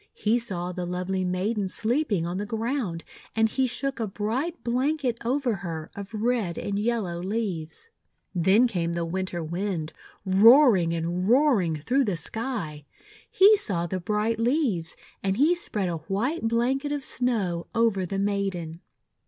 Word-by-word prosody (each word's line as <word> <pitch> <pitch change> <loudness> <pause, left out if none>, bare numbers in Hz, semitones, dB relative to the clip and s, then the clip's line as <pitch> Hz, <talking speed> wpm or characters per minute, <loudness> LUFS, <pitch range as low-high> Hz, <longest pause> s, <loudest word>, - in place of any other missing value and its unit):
He 225 +3 +1
saw 180 -6 -3
the 180 -1 -4
lovely 185 +1 -2
maiden 190 +3 -1
sleeping 220 - 0
on 175 +2 -3
the 205 - -2
ground; 225 -6 -2 0.3
and 225 0 +4
he 260 +4 0
shook 275 +2 -3
a 225 - -1
bright 240 - -3
blanket 255 0 0
over 250 -2 0
her 165 -3 -6
of 200 +1 -7
red 220 -5 -1
and 200 0 -2
yellow 205 -6 -1
leaves. 195 - -4 0.4
Then 190 +7 +4
came 170 -6 -2
the 170 0 -1
Winter 180 0 -3
Wind, 170 -1 -3 0.3
roaring, 190 - +5
roar 260 -1 +4
ing 165 -3 -1
through 250 - +1
the 195 -5 -1
sky. 195 - -4 0.5
He 405 +3 +7
saw 195 - -2
the 185 +2 -3
bright 210 +4 -1
leaves; 230 - 0 0.3
and 195 0 0
he 300 +7 +5
spread 210 - -2
a 170 -2 -2
white 225 - -2
blanket 260 +5 0
of 290 -2 -3
Snow 200 -9 -1
over 225 -5 +2
the 195 +2 -3
maiden. 195 -5 -2
205 Hz, 155 wpm, -26 LUFS, 175-240 Hz, 0.5 s, He